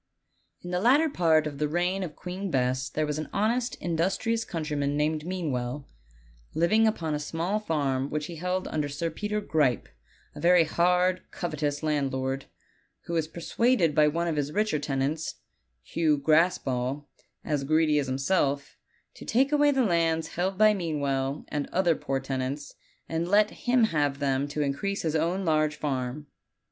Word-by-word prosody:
Isr 175 - -5
the 180 - 0
latter 275 - +4
part 160 - +3
of 145 -2 -5
the 150 - +1
reign 175 +5 0
of 165 -5 -5
Queen 185 +2 -5
Bess 130 -2 0
there 155 +3 -1
was 150 0 -2
an 155 - -5
honest, 235 +4 0
industrious 190 +7 -1
countryman 150 -5 -2
named 155 +1 0
Meanwell, 145 -7 -3 0.7
liv 170 +3 +2
ing 220 +1 +5
upon 165 -8 -1
a 150 - -1
small 170 +7 -2
farm 140 -8 -1
which 150 0 -2
he 170 +1 -8
held 180 +2 -2
under 150 -2 -1
Sir 160 +4 -3
Peter 210 +5 -2
Gripe, 150 - +1 0.5
a - - -10
very 175 0 +5
hard, 180 +3 +2
covetous 150 -4 -3
landlord, 135 -3 -1 0.6
who 170 - -5
was 160 -2 0
per 170 +2 -9
suaded 220 -5 +2
by 150 0 +5
one 170 +3 0
of 160 -3 -1
his 145 0 -1
richer 210 -3 0
tenants, 145 +2 -2 0.5
Hugh 155 -3 +1
Graspall, 140 -3 +1 0.4
as 150 -3 -1
greedy 155 +1 +3
as 140 - -2
himself, 140 +1 0 0.4
to - - -12
take 265 +5 +2
away 295 0 +4
the 265 -3 +2
lands 165 -3 +1
held 185 +2 -2
by 215 +1 +6
Mean 165 -6 -2
well 135 0 -1
and 150 -1 -2
other 180 -2 +2
poor 135 -2 -2
tenants, 135 +2 -4 0.3
and 165 +1 -2
let 210 +3 +4
him 245 -1 +1
have 145 -9 +1
them 140 -1 0
to 145 +1 -2
increase 195 +9 -2
his 160 -1 -1
own 175 +5 0
large 155 -1 +2
farm. 135 -1 -3
155 Hz, 170 wpm, -27 LUFS, 145-180 Hz, 0.7 s, by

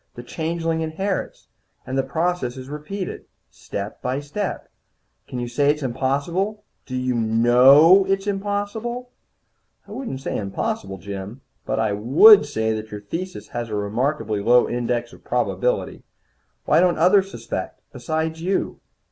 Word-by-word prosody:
The 120 - -8
changeling 165 +3 -2
inherits, 185 +5 -3 0.4
and 130 - -4
the 135 - +3
process 160 -2 -2
is 130 +1 -9
repeated, 165 +6 -6 0.3
step 100 +1 -7
by 130 +2 -1
step. 165 +8 -4 0.6
Can 125 - -6
you 120 0 -3
say 140 +4 +1
it's 150 0 0
impossible? 145 - -1 0.2
Do 130 - -5
you 125 0 0
know 125 - +6
it's 195 0 0
impossible?" 205 +5 -3 0.8
"I - - -13
wouldn't 230 - -5
say - - -3
impossible, 95 -1 -3
Jim. 100 +5 -7 0.3
But - - -1
I 110 -2 +1
would 145 - +7
say 110 -5 -1
that 110 0 -5
your 105 -1 -7
thesis 165 - -6
has 120 -1 -4
a 105 - -3
remarkably 110 +1 -1
low 120 +4 +4
index 120 0 -2
of - - -16
probability. - - -1 0.6
Why - - +4
don't 180 -1 +3
others 190 +4 +4
suspect, 115 - -6
besides 160 +6 -3
you?" 185 +3 -1
140 Hz, 145 wpm, -22 LUFS, 120-185 Hz, 0.8 s, would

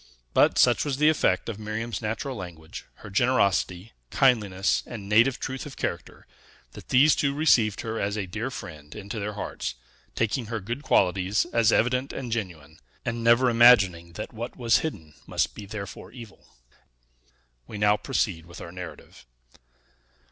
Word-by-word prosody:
But - - +4
such 120 -1 +4
was 140 -3 -2
the 150 +2 +5
effect 95 -12 +1
of 110 -3 -5
Miriam's 110 0 -4
natural 115 +5 -3
language, 85 -5 -9 0.2
her 105 - -9
generosity, 100 -4 +1 0.2
kindliness, 105 -8 +2
and 105 -5 -8
native 115 +5 +4
truth 130 +2 -5
of 140 - -11
character, - - -5 0.5
that - - -13
these 140 +4 +5
two 140 -1 0
received 120 -9 +3
her 110 0 -4
as 100 +2 -1
a 100 - -2
dear 110 +7 -4
friend 75 - -9
into 105 +1 -6
their 105 +1 -4
hearts, 100 - -5 0.4
taking 115 +1 -1
her 115 0 -3
good 120 +7 -5
qualities 95 -4 +2
as 115 -1 +4
evident 125 +3 +1
and 125 -4 -5
genuine, 85 -8 -5 0.3
and 120 -1 -3
never 120 +2 +5
imagining 100 -8 +5
that - - -7
what 115 +2 -6
was 120 -2 +3
hidden 80 - -6
must - - 0
be 105 - -9
therefore 100 -1 -8
evil. 115 -4 -13 1.2
We - - -7
now 105 0 +4
proceed 105 - -2
with 85 - -11
our 85 - -8
narrative. 90 -8 -10
110 Hz, 160 wpm, -26 LUFS, 95-120 Hz, 1.2 s, the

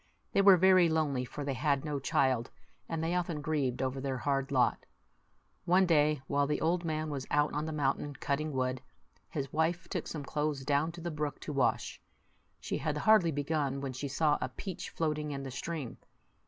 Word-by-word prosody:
They - - +3
were 195 -2 +8
very 185 -1 +6
lonely, 145 -5 0
for 145 +3 -6
they 140 - -1
had 140 +2 0
no 150 -2 -2
child, 130 -3 +1 0.4
and 165 -1 -2
they 165 +2 0
often 175 -3 -1
grieved 140 -5 -1
over 130 +1 -2
their 135 -1 -2
hard 135 +1 -1
lot. 125 -3 +2 0.8
One 185 +2 +5
day, 150 -4 +3
while 140 +1 +1
the 150 - 0
old 170 +2 +1
man 155 -1 -2
was 135 -2 -4
out 150 0 +2
on 150 +1 -2
the - - -3
mountain 145 -1 -1
cutting 150 +3 -2
wood, 130 -1 -1 0.5
his 135 -2 -4
wife 165 +3 0
took - - -3
some 150 -3 -5
clothes 150 -1 -2
down 145 +3 +1
to 170 - -9
the 170 0 -3
brook 150 -1 -3
to 150 - -5
wash. 135 -3 0 0.6
She - - -3
had 150 +1 -1
hardly 185 0 +5
begun, 145 -1 -1
when 135 -1 -4
she 130 +3 -4
saw 145 +2 +2
a - - -1
peach 185 +7 -6
floating 150 -2 -2
in 140 -1 -4
the 135 - -6
stream. 145 -1 -5
150 Hz, 195 wpm, -31 LUFS, 135-160 Hz, 0.8 s, were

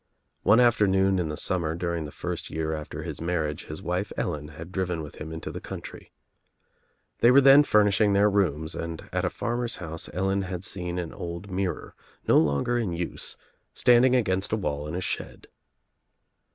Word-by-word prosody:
One 105 +4 +5
afternoon 95 -5 +3
in 85 -3 -1
the 75 - -4
summer 80 -2 -1
during 85 -2 -2
the 75 - -8
first - - -5
year 80 0 -2
after 75 -1 -6
his - - -6
marriage 80 -3 -2
his 75 - -8
wife 90 +4 -2
Ellen 75 -4 -2
had 80 +4 -10
driven 90 -4 -2
with 75 - -10
him 80 +1 -7
into 80 0 -5
the - - -7
country. - - -9 1.1
They 120 - +6
were 130 +3 +7
then 140 +1 +8
furnishing 105 -3 +3
their 100 +1 +5
rooms 85 -6 0
and 80 0 -6
at - - 0
a - - +1
farmer's 120 0 -2
house 80 -1 -5
Ellen 95 +4 0
had 90 -1 -5
seen 90 -3 -3
an 85 -3 -4
old 85 +3 -6
mirror, 95 0 -3 0.3
no - - +6
longer 80 +11 +1
in 110 -6 -1
use, 85 +1 -3 0.4
standing 125 +1 +5
against 95 -5 +1
a 110 - +1
wall 75 -7 -3
in 80 - -5
a 90 - -2
shed. - - -4
90 Hz, 180 wpm, -26 LUFS, 80-100 Hz, 1.1 s, then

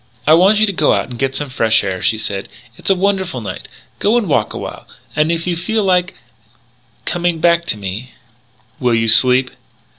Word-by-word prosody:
"I 155 - +5
want 190 +6 +5
you 215 - +5
to 200 - -2
go 155 -4 +2
out - - -1
and 120 -2 -9
get 135 0 -1
some 145 0 -3
fresh 115 -5 +2
air," 95 -2 -3
she 110 0 +1
said. 100 -2 -4 0.3
"It's - - -5
a 195 - +4
wonderful 190 -6 -1
night. 105 - -7 0.3
Go 215 +4 +2
and 230 -5 -1
walk 115 -8 0
a - - -6
while. - - -8 0.3
And 155 +2 +2
if 170 0 -2
you 180 -1 -1
feel 210 +6 -1
like 180 -1 +1 0.9
coming 175 -1 -1
back 170 +1 +2
to 110 - -2
me 105 +6 -6 0.3
" 110 0 -36
"Will 125 -2 +1
you 115 0 +1
sleep?" 125 +3 +5
150 Hz, 210 wpm, -16 LUFS, 115-180 Hz, 0.9 s, I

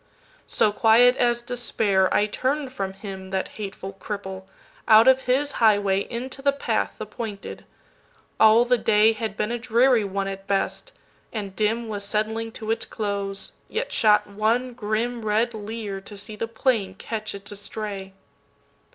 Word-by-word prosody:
So, 210 - +2
quiet 230 +4 +5
as 240 -1 +1
despair, 220 -6 +1
I 205 - +3
turn'd 260 +5 -2
from 195 -5 -3
him, 190 -1 -8
That 190 0 -2
hateful 195 -2 -7
cripple, 190 -1 -6 0.4
out 220 +2 +7
of 260 0 +6
his 285 +3 +2
highwayInto 220 +5 +1
the 280 - +4
path 280 - -1
the - - -5
pointed. 215 -4 -7 0.7
All 220 +2 +7
the 245 0 +2
dayHad 215 0 +2
been 210 - -1
a 240 - -2
dreary 240 0 +3
one 195 0 -2
at 195 0 -6
best, 200 - -1 0.4
and 200 -4 -5
dimWas 215 0 -1
settling 220 +2 -1
to 220 0 -4
its 225 - -1
close, 200 -2 -3 0.2
yet - - -3
shot 210 -1 +4
one 225 +5 0
grimRed 225 0 -1
leer 210 -2 -5
to 205 +1 -10
see 210 +2 -6
the 225 +2 -3
plain 225 -4 0
catch 215 +1 -5
its 200 +1 -8
estray. 200 -1 -6
215 Hz, 145 wpm, -24 LUFS, 200-235 Hz, 0.7 s, out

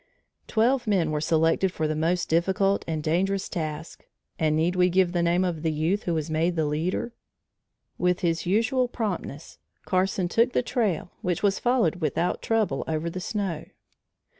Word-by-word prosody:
Twelve 240 +2 +2
men 180 -7 +2
were 150 -1 -1
selected 165 +4 +2
for 160 -3 -1
the 155 - -1
most 170 +3 0
difficult 190 +4 +1
and 155 -2 -2
dangerous 190 +5 0
task 155 -1 -5 0.4
and 155 -1 +2
need 165 +3 +1
we 180 0 +4
give 180 0 +2
the 175 -1 0
name 170 +2 +2
of 170 -4 -2
the 160 -1 0
youth 160 +7 -1
who 170 - 0
was 155 -1 -2
made 165 +2 0
the 160 -2 +1
leader? 165 +10 -2 0.9
With 180 +1 +1
his 170 -1 0
usual 230 +6 +2
promptness, 200 - -5 0.3
Carson 185 0 +1
took 230 +7 +2
the - - +1
trail 215 -8 -1
which 180 0 -2
was 200 -1 +2
followed 240 -10 +2
without 170 +1 -1
trouble 215 -11 0
over 160 +1 -2
the 185 - -5
snow. 180 -6 -3
175 Hz, 170 wpm, -26 LUFS, 160-195 Hz, 0.9 s, we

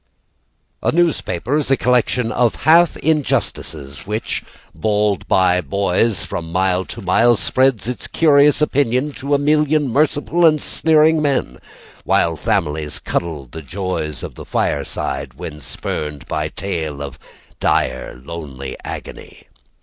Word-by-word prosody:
A - - +1
newspaper 145 - 0
is 150 -3 -1
a 135 - +4
collection 125 -1 +1
of 120 -2 0
half 165 +2 +5
injustices 115 - -1
Which, 105 +2 -3 0.3
bawled 105 -2 0
by 90 -1 +3
boys 100 +3 0
from 80 -1 -5
mile 95 +1 +1
to - - -8
mile, 115 +6 +4
Spreads 125 +2 +1
its 125 - -3
curious 150 -1 +4
opinion 140 -1 +1
To 140 +1 -1
a - - +4
million 150 0 +2
merciful 150 +5 +1
and 155 -2 +5
sneering 160 0 +3
men, 135 - -1 0.4
While 85 -1 +2
families 75 -1 -1
cuddle 80 -5 -3
the 80 +6 -9
joys 80 -2 -4
of - - -6
the - - -10
fireside 65 -2 -2
When 75 -1 -8
spurred 75 +1 -5
by - - -2
tale 80 -7 -4
of 70 -2 -8 0.4
dire 60 - 0
lone 70 -6 -7
agony. - - -9
105 Hz, 130 wpm, -19 LUFS, -, 0.4 s, half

